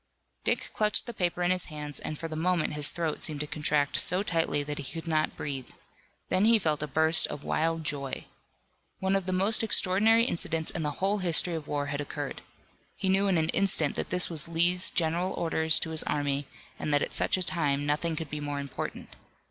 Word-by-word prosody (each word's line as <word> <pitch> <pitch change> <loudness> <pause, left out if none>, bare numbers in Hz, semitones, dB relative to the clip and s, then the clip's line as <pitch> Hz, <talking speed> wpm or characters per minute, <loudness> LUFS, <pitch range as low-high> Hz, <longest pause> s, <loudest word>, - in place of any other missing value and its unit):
Dick - - -1
clutched 210 -1 +1
the 235 - -7
paper 180 -3 -1
in 175 - +2
his 185 -1 0
hands 150 -2 -1
and 155 - -5
for 165 - -5
the 160 - -6
moment 170 -1 0
his 150 -1 +3
throat 165 -3 -3
seemed 150 -3 +1
to - - -2
contract 150 -1 0
so 185 +2 +5
tightly 165 -6 0
that 145 0 -5
he 140 - -7
could 165 0 -7
not 155 -1 0
breathe. 135 -3 -4 0.6
Then 190 +3 +3
he 230 +1 +6
felt 155 -7 -1
a 150 - -3
burst 160 +2 +4
of 145 - -7
wild 165 +1 0
joy. 140 -3 -3 0.7
One 190 +1 +1
of 195 -1 -1
the - - -1
most 195 +4 +3
extraordinary 220 +1 +3
incidents 165 -8 -1
in 165 - -4
the 150 - -1 0.2
whole 205 +1 +1
history 175 -1 +2
of 160 -2 -5
war 145 -1 -2
had 145 0 -3
occurred. 145 0 -6 0.5
He 190 - -2
knew 195 +1 +2
in 190 -3 +2
an 160 0 0
instant 170 -7 +2
that - - -3
this 180 0 +2
was 160 -3 0
Lee's 175 +2 +3
general 170 +3 -1
orders 160 -1 +2
to 160 - -4
his 160 - +3
army, 145 -1 -1 0.3
and 150 - -3
that 145 0 +3
at - - -5
such - - +2
a 185 - +3
time 145 -5 +1
nothing 150 +3 0
could 160 -2 -6
be 150 - -4
more 145 -1 -4
important. 140 -1 -6
160 Hz, 215 wpm, -28 LUFS, 150-180 Hz, 0.7 s, he